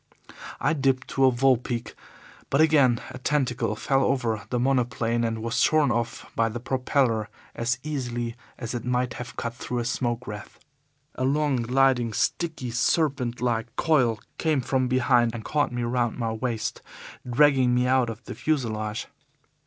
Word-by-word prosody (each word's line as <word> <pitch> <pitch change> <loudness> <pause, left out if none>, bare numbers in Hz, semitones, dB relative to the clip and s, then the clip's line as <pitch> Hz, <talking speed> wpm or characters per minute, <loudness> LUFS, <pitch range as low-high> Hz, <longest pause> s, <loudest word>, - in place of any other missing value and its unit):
I - - +2
dipped 135 -3 +1
to 135 - +2
a 130 - +6
vol 130 +1 +4
pique, 120 -1 -5 0.6
but 140 - +2
again 145 -7 +5
a 130 - -8
tentacle 125 -6 0
fell 135 +5 +1
over 115 -6 0
the 125 - 0
monoplane 120 -2 +1
and 115 -1 -2
was 115 0 -1
shorn 155 -5 +4
off 120 0 -2
by 115 0 +2
the 120 +2 -5
propeller 125 -3 0 0.2
as 120 +2 -1
easily 120 -6 -3 0.2
as 115 -1 -5
it 120 -2 -3
might 125 -1 0
have 125 +1 -8
cut 115 - -3
through 125 0 -5
a 120 - -1
smoke 120 0 -1
wreath. 105 -2 -8 0.6
A 130 - -4
long, 145 0 +2
gliding, 125 -1 +2
sticky, 160 -2 -1
serpent 125 0 0
like 120 -1 -1
coil 125 -9 +2 0.2
came 155 -4 +1
from 130 +1 0
behind 120 -2 +3
and 110 - -7
caught 145 -4 +1
me 120 0 -2
round 120 0 0
the 115 -1 -1
waist, 115 0 -3 0.5
dragging 130 -1 +4
me 125 0 +2
out 130 -2 +3
of 115 0 -7
the - - -7
fuselage. 110 -7 -2
125 Hz, 165 wpm, -26 LUFS, 115-135 Hz, 0.6 s, a